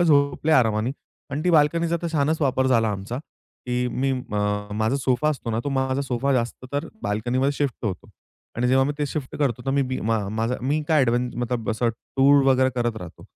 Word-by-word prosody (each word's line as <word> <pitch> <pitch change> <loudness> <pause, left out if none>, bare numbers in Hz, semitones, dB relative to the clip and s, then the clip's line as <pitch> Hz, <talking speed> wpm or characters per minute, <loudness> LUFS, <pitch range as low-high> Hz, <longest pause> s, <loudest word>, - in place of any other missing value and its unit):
झोपले 150 -1 +3
आरामाने 115 -3 +3 0.4
आणि 145 +2 -2
ती 180 - +3
बाल्कनीचा 165 +2 +3
तर - - -1
छानच 155 +2 +1
वापर 130 -2 +2
झाला 115 -4 +3
आमचा, 100 +4 -4
की 125 -4 -5
मी 135 +3 -1
म 105 -4 -2
माझा 110 +5 +1
सोफा 130 +1 +1
असतो 130 -5 -4
ना, 110 - -1
तो - - -1
माझा 130 0 0
सोफा 135 +1 0
जास्त 120 0 -1
तर 145 +3 -1 0.2
बाल्कनीमध्ये 120 +7 0
शिफ्ट 140 -4 -3
होतो 95 -5 -4 0.5
आणि 125 +2 +1
जेव्हा 135 +1 +4
मी 145 - -1
ते 145 - 0
शिफ्ट 140 -2 -5
करतो, 125 -5 0
तर - - +1
मी 140 +1 +2
बी 130 -1 -3
मा 115 +1 +1
माझा 115 +4 -1
मी 145 +5 0
काय 155 -2 +4
ॲडव्हें 120 +1 +1
मतलब 120 -2 -2
असं 115 +2 0
टूर 135 +4 +3
वगैरे 130 -1 +4
करत 120 -2 -1
राहतो. 90 -6 -9
130 Hz, 200 wpm, -24 LUFS, 115-140 Hz, 0.5 s, जेव्हा